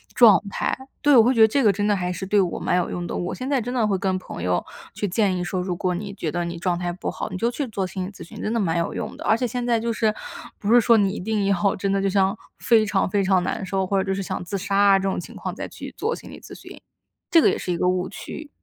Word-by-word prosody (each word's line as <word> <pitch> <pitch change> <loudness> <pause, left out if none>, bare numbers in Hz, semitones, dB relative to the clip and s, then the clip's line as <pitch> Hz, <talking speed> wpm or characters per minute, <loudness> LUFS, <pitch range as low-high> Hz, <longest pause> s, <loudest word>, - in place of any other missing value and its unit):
状 225 -5 +7
态。 - - -1 0.3
对， 290 -1 +5
我 225 - +8
会 250 - +3
觉 230 - +3
得 220 - +9
这 275 +4 +1
个 205 -3 +5
真 205 +1 -1
的 210 - +3
还 180 -2 -2
是 185 - -5
对 205 +1 +3
我 180 -3 0
蛮 - - +1
有 180 - 0
用 175 - -4
的， - - -4
我 175 - -3
现 260 +1 -5
在 275 -3 +2
真 245 +2 -4
的 235 -4 +2
会 195 -2 +1
跟 190 0 0
朋 85 - -8
友 90 0 0 0.3
去 205 - -2
建 195 -1 +1
议 180 - -2
说， 180 +1 -2
如 180 -1 -2
果 180 +1 -1
你 200 +2 -5
觉 170 -5 -3
得 175 +1 -2
你 170 0 -5
状 175 -1 0
态 175 -1 -2
不 180 - -4
好， - - -5
你 - - -5
就 235 +4 +1
去 275 +2 -3
做 200 -4 -2
心 185 0 -4
理 200 - -8
咨 - - -11
询， - - -11
真 215 - -2
的 230 - +1
蛮 170 -3 0
有 170 - -2
用 - - -5
的。 - - -8
而 220 - +4
且 250 - -1
现 245 +1 -3
在 235 -2 +2
就 230 +1 -1
是 220 -1 +1 0.5
不 215 +3 +1
是 245 - +8
说 230 +1 +5
你 200 -2 +3
一 - - -5
定 210 +1 -1
要 200 0 +2
真 195 +1 -1
的 195 - +1
就 195 - +1
像 195 +2 +2 0.2
非 220 -2 +4
常 195 -2 0
非 200 0 +1
常 190 -1 +3
难 190 - -3
受， 190 0 -1
或 195 - +1
者 190 - 0
就 195 - +1
是 195 - -3
想 - - -4
自 200 +3 -4
杀 195 +1 -2
啊 200 -1 +6
这 - - -5
种 - - -2
情 175 - -9
况 - - -5
再 - - -5
去 - - -9
做 460 +2 -1
心 - - -12
理 - - -10
咨 - - -12
询， - - -12 0.5
这 330 - +7
个 - - +5
也 - - 0
是 180 - -4
一 175 - -1
个 180 - +1
误 185 0 0
区。 310 -2 -8
195 Hz, 340 characters per minute, -23 LUFS, 185-220 Hz, 0.5 s, 得